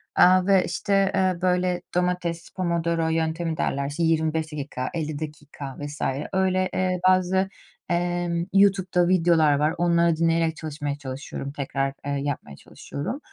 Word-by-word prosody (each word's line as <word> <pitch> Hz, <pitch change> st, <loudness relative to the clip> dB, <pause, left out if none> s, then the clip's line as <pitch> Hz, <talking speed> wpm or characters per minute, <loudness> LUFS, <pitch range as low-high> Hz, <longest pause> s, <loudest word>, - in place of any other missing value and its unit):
Aaa, 185 Hz, 0 st, +6 dB
ve, 195 Hz, -2 st, +4 dB
işte, 195 Hz, -2 st, +1 dB
eee, 185 Hz, -2 st, +1 dB
böyle, 180 Hz, -1 st, +1 dB
domates, 180 Hz, -2 st, -1 dB
Pomodoro 170 Hz, -2 st, 0 dB
yöntemi 160 Hz, 0 st, -1 dB
derler, 140 Hz, -1 st, -1 dB
işte, 150 Hz, +4 st, -2 dB
25 160 Hz, -1 st, +1 dB
dakika, 140 Hz, -3 st, -4 dB
50 155 Hz, -3 st, -3 dB
dakika 150 Hz, -3 st, -7 dB
vs. 145 Hz, 0 st, -7 dB, 0.3 s
öyle, 185 Hz, 0 st, +1 dB
eee, 185 Hz, -1 st, 0 dB
bazı, 185 Hz, +1 st, +3 dB, 0.4 s
emm, 175 Hz, -1 st, 0 dB
YouTube'da 190 Hz, -3 st, +3 dB
videolar 170 Hz, -4 st, +4 dB
var. 150 Hz, +3 st, +1 dB
Onları 170 Hz, -1 st, +3 dB
dinleyerek 165 Hz, 0 st, +1 dB
çalışmaya 145 Hz, -2 st, -4 dB
çalışıyorum. 135 Hz, 0 st, -6 dB
Tekrar, 135 Hz, -1 st, -2 dB
eee, 145 Hz, -, -2 dB
yapmaya 140 Hz, -, -4 dB
çalışıyorum. 145 Hz, -, -6 dB
170 Hz, 135 wpm, -25 LUFS, 150-180 Hz, 0.4 s, Aaa